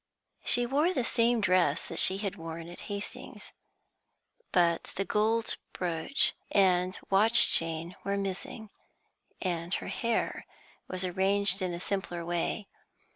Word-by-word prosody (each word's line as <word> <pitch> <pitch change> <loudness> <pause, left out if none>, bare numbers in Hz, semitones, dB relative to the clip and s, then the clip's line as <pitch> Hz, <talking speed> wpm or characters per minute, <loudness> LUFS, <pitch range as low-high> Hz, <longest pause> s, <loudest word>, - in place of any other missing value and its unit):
She 245 0 +4
wore 295 +8 +1
the 255 - 0
same 235 0 +1
dress 185 -7 +2
that - - -3
she 190 - +7
had 200 -1 -4
worn 165 -1 -8
at 175 - -10
Hastings, 205 0 -7 1.0
but 170 -2 +2
the 195 - -2
gold 220 +3 0 0.2
brooch 170 - +1 0.2
and 185 -2 +2
watch 220 +4 +6
chain 165 +2 +1
were 200 0 -2
missing, 200 +3 -5 0.7
and 175 -2 -3
her - - -5
hair 235 -1 -2 0.4
was 185 0 -2
arranged 190 +1 +1
in 185 -1 -2
a 170 - -5
simpler 175 -3 -4
way. 175 +4 -3
190 Hz, 130 wpm, -29 LUFS, 175-210 Hz, 1.0 s, she